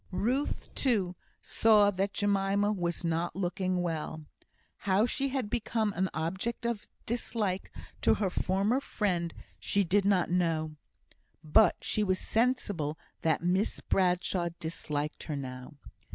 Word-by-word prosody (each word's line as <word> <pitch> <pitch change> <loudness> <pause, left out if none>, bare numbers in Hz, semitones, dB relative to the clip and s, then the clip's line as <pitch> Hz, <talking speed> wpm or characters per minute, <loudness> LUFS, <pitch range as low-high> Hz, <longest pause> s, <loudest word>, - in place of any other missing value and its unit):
Ruth, 250 +9 -1
too, 200 -9 +1 0.3
saw 210 -2 +5
that 195 +1 -1
Jemima 200 0 +1
was 175 -4 -1
not 165 +1 -1
looking 185 -1 -1
well. 160 -2 -3 0.5
How 200 +2 +2
she 275 +3 0
had 265 -4 -2
become 220 -1 0
an 190 +1 0
object 190 +10 -3
of 235 -3 -2 0.2
dislike 215 -5 -2 0.3
to - - +4
her 195 -4 -1
former 195 +8 +1
friend 180 -10 -1 0.3
she 200 - +2
did 195 +3 +2
not 190 -3 +2
know; 160 -3 0 0.7
but 165 +5 +5
she 215 - +1
was 185 -2 +1
sensible 205 - 0 0.2
that 160 0 +1
Miss 185 +5 +1
Bradshaw 180 -1 +1
disliked 150 -2 -3
her 155 - -3
now. 130 +1 -7
190 Hz, 130 wpm, -30 LUFS, 170-210 Hz, 0.7 s, saw